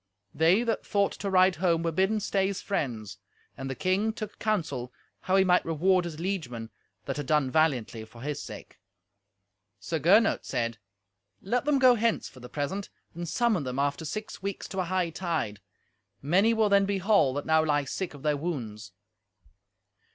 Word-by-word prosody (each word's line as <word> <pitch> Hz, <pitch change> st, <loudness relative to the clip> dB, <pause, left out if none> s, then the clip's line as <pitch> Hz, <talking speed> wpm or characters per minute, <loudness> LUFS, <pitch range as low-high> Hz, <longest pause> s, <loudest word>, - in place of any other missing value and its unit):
They 165 Hz, +9 st, +4 dB
that 230 Hz, -2 st, -1 dB
thought 200 Hz, -1 st, +1 dB
to 200 Hz, -, -2 dB
ride 185 Hz, -1 st, +4 dB
home 170 Hz, -1 st, +1 dB
were 165 Hz, -, 0 dB
bidden 190 Hz, +6 st, +1 dB
stay 195 Hz, -1 st, 0 dB
as 200 Hz, -, -3 dB
friends. 110 Hz, -, -3 dB, 0.4 s
And 135 Hz, -1 st, -6 dB
the 135 Hz, -, -3 dB
king 195 Hz, +7 st, +1 dB
took 215 Hz, -2 st, -7 dB
counsel 155 Hz, -, -1 dB, 0.3 s
how 185 Hz, -, 0 dB
he 195 Hz, -, +6 dB
might 180 Hz, -1 st, +3 dB
reward 180 Hz, +3 st, +2 dB
his 165 Hz, -3 st, -6 dB
liegemen 130 Hz, -, -4 dB, 0.3 s
that -, -, -3 dB
had 145 Hz, -3 st, -4 dB
done 150 Hz, -3 st, +2 dB
valiantly 130 Hz, -8 st, +1 dB
for 115 Hz, +1 st, -15 dB
his 145 Hz, 0 st, -3 dB
sake. -, -, -10 dB, 1.0 s
Sir 160 Hz, +11 st, -3 dB
Gernot 205 Hz, +9 st, +4 dB
said, 115 Hz, -1 st, -2 dB, 0.6 s
"Let 245 Hz, +6 st, -1 dB
them 295 Hz, -1 st, +3 dB
go 255 Hz, -2 st, +7 dB
hence 230 Hz, -1 st, 0 dB
for 130 Hz, -, -14 dB
the 125 Hz, 0 st, -10 dB
present, 185 Hz, +8 st, -3 dB, 0.2 s
and 170 Hz, 0 st, -5 dB
summon 230 Hz, -5 st, +1 dB
them 130 Hz, -1 st, -4 dB
after 140 Hz, +2 st, 0 dB
six 215 Hz, +8 st, -6 dB
weeks 200 Hz, 0 st, -4 dB
to 190 Hz, -, -4 dB
a 185 Hz, -, 0 dB
hightide. 170 Hz, -, -2 dB, 0.6 s
Many 190 Hz, -, +3 dB
will 220 Hz, -1 st, +3 dB
then 200 Hz, -1 st, +4 dB
be 200 Hz, -1 st, 0 dB
whole 190 Hz, -9 st, +3 dB
that 145 Hz, -, -3 dB
now 160 Hz, 0 st, +4 dB
lie 145 Hz, -2 st, +1 dB
sick 160 Hz, +4 st, -4 dB
of 140 Hz, -, -13 dB
their 150 Hz, -1 st, +2 dB
wounds." 110 Hz, -, -5 dB
170 Hz, 180 wpm, -28 LUFS, 140-195 Hz, 1.0 s, go